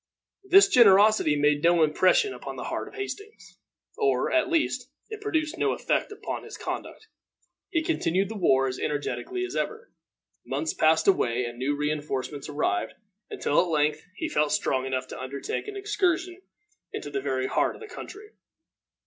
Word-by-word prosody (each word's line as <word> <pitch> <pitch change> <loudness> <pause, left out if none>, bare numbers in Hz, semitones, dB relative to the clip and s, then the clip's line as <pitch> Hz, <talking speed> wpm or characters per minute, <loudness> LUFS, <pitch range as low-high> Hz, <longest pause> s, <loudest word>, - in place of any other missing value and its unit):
This 390 +1 +7
generosity 210 - +6
made 145 0 +2
no 170 0 +4
impression 185 - +3
upon - - -7
the - - -6
heart - - -4
of - - -12
Hastings, 410 +1 -8 0.4
or, 415 -3 +1
at 320 +1 +2
least, 275 -7 0 0.2
it 435 -1 -7
produced 325 -6 -1
no - - +2
effect - - -1
upon 420 - -5
his - - -9
conduct. 440 - -6 0.6
He 330 -2 0
continued 195 - 0
the 220 - -7
war 135 -9 +3
as 130 - -4
energetically 345 - -3
as - - -7
ever. 460 +2 -3 0.5
Months 320 - -2
passed 160 +1 +3
away 125 -10 +2
and 120 0 -7
new 140 +3 0
re 150 +1 -1
enforcements 145 -1 -4
arrived, 115 -7 -1 0.3
until 145 - +1
at 180 - -1
length 150 -1 +1
he 320 - -3
felt 150 - +1
strong 130 0 0
enough 130 -1 -2
to - - -7
undertake 135 - -4
an 415 -1 -6
excursion 370 -2 -1 0.5
into 145 - -6
the 140 -1 -2
very 130 -1 -1
heart - - 0
of - - -13
the 435 - -8
country. 425 0 -10
185 Hz, 170 wpm, -26 LUFS, -, 0.6 s, This